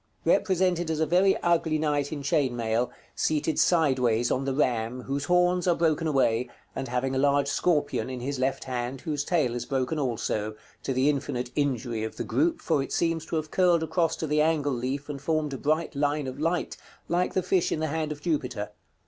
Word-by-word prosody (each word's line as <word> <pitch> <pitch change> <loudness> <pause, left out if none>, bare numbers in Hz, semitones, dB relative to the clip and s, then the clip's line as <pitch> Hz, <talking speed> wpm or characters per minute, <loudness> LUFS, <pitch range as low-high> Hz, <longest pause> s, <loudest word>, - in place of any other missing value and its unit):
Represented 180 -3 +2
as 160 -1 -1
a 160 - +3
very 185 +5 +3
ugly 165 -2 +2
knight 145 -2 0
in 145 -2 -4
chain 135 -3 +1
mail, 115 +1 0 0.2
seated 155 0 0
sideways 130 -8 +3
on 135 +1 0
the 135 - 0
ram, 125 -3 0
whose 140 +1 -2
horns 180 +1 +2
are 175 - +4
broken 165 -1 +1
away, 125 -4 +2 0.3
and 135 - -3
having 125 +2 -1
a 130 - 0
large 140 0 +3
scorpion 145 -6 0
in 130 -1 -5
his 135 +2 -3
left 130 +1 0
hand, 125 0 -4
whose 150 -2 -2
tail 150 -8 +1
is 120 0 -4
broken 135 +3 -1
also, 110 -5 -2 0.3
to - - -3
the 130 +2 +2
infinite 130 -4 -1
injury 125 -6 -1
of 110 - -5
the - - -2
group, 330 0 0
for 155 -4 +2
it 135 - -5
seems 165 -1 0
to - - -3
have 155 -1 -2
curled 175 -3 +3
across 160 +1 +1
to - - -3
the 150 0 +2
angle 150 -3 +1
leaf, 130 +3 -3
and 140 -2 -6
formed 155 -1 0
a - - -3
bright 155 +2 0
line 145 +1 0
of 130 +1 -6
light, 165 +2 -1 0.3
like 175 +1 0
the 185 - +2
fish 180 0 +1
in - - 0
the 160 - 0
hand 155 0 -2
of 150 0 -7
Jupiter. 125 -10 -2
145 Hz, 210 wpm, -27 LUFS, 130-160 Hz, 0.3 s, are